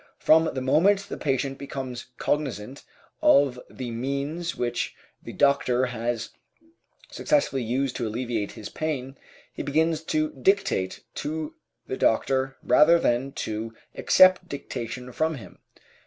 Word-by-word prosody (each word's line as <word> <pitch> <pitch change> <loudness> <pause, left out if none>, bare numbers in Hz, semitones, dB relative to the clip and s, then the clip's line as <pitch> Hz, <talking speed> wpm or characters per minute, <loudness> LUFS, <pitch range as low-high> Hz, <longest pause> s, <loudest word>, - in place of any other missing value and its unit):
From 160 +1 +4
the 130 - -2
moment 185 +10 +4
the - - -4
patient 135 -1 -1
becomes 130 -3 -6
cognizant 135 -4 -2 0.4
of 135 -3 +4
the 125 -2 -6
means 140 +8 -3
which 120 -1 -2 0.3
the - - -8
doctor 130 -3 +2
has 115 -2 -3 0.8
successfully 285 - +1
used 125 +3 -1
to 120 - -2
alleviate 115 -2 -3
his 105 - -8
pain, 135 -4 -4 0.4
he - - -5
begins 160 +2 +1
to 155 0 0
dictate 190 - 0
to 155 0 -4 0.3
the 130 - -4
doctor 135 +3 +1
rather 155 +7 +6
than 130 -3 0
to 110 +1 -4 0.2
accept 185 -1 +5
dictation 125 -2 -6
from 160 +5 0
him. 110 -9 -12
135 Hz, 125 wpm, -26 LUFS, 120-155 Hz, 0.8 s, rather